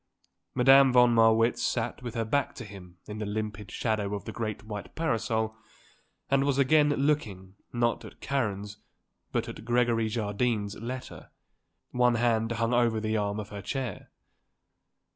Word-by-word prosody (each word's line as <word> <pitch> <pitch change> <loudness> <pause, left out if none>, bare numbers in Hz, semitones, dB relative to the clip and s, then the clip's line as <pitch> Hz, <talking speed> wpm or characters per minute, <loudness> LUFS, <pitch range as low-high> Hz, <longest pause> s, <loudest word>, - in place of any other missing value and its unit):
Madame 135 +1 +7
von 125 -1 +5
Marwitz 115 +1 +4
sat 120 0 -1
with 120 -2 -6
her 115 -1 -1
back 140 +4 0
to 120 - -7
him 95 -3 -12
in 105 0 -7
the 105 - -3
limpid 105 -1 -4
shadow 105 -3 -1
of 100 - -7
the - - -5
great 110 -3 -4
white 105 -2 -7
parasol 115 -7 -1 0.7
and 135 0 +2
was 140 -1 +1
again 145 +2 +4
looking, 135 -11 -1 0.2
not 120 -1 0
at - - -12
Karen's, 105 -6 -2 0.5
but - - -1
at - - -8
Gregory 120 -1 +1
Jardine's, 105 -1 -1
letter. 125 +3 -7 0.6
One 125 -1 +3
hand 115 -1 +1
hung 115 +1 0
over 120 -2 +2
the 110 0 -1
arm 105 0 -1
of 105 -1 -6
her 100 -1 -7
chair. 130 +5 -4
115 Hz, 155 wpm, -28 LUFS, 105-125 Hz, 0.7 s, Madame